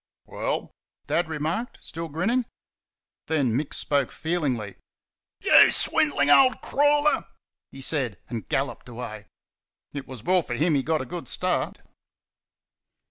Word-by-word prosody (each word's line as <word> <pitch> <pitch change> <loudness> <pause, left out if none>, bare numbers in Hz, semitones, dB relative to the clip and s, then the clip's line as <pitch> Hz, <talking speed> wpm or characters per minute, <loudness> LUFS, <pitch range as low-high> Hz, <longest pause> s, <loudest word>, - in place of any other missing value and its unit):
"Well?" - - -3 0.3
Dad 170 -1 0
remarked, 160 +10 -3
still 165 0 -6
grinning. 220 - 0 0.8
Then 140 -8 +1
Mick 145 +3 -2
spoke 140 -3 0
feelingly. 140 - -2 0.6
"YOU - - +7
SWINDLING 145 0 +3
OLD 255 - +6
CRAWLER!" 290 +1 +3 0.5
he 135 - -10
said, 130 - 0
and 115 -3 -6
galloped 135 -2 -2
away. 110 -3 -7 0.7
It 140 -2 -6
was 125 -5 -9
well 185 +3 +3
for 120 -6 -5
him 155 +6 +2
he 140 - +2
got 155 +3 0
a - - -5
good 175 -7 -7
start. - - -2
150 Hz, 130 wpm, -25 LUFS, 130-175 Hz, 0.8 s, YOU